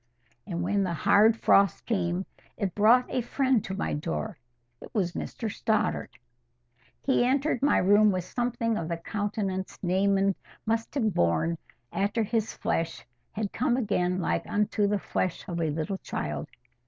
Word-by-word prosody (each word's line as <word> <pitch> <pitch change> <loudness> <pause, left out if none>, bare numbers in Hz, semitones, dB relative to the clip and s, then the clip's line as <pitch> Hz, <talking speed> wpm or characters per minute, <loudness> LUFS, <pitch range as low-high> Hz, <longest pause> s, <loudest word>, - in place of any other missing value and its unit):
And 175 -1 -3
when 200 +3 +1
the 175 -3 -1
hard 210 +6 +5
frost 195 -3 +3
came, 185 -4 -1 0.3
it 195 -5 -2
brought 230 +4 +5
a 255 - -1
friend 260 -1 +1
to 190 - -4
my - - -1
door. 80 - -3 0.4
It - - -10
was 185 -5 +1
Mr 225 - -5
Stoddart. 220 0 -1 0.9
He 265 -3 +3
entered 270 +1 +1
my 285 - +4
room 205 +3 +5
with 185 -2 -1
something 235 0 -1
of 160 - -4
the 170 0 -2
countenance 200 0 -3
Naaman 195 +2 +2 0.3
must 225 +3 -1
have 220 -7 +1
borne, 85 - +1 0.3
after 205 +3 +1
his 220 0 -1
flesh 165 -5 -2 0.3
had 210 -2 -3
come 245 0 +1
again 185 -6 0
like 175 - -1
unto 205 0 +1
the 205 +1 +1
flesh 185 -2 -2
of 170 -2 -3
a 160 - +1
little 160 +6 -3
child. - - -4
200 Hz, 155 wpm, -28 LUFS, 180-225 Hz, 0.9 s, hard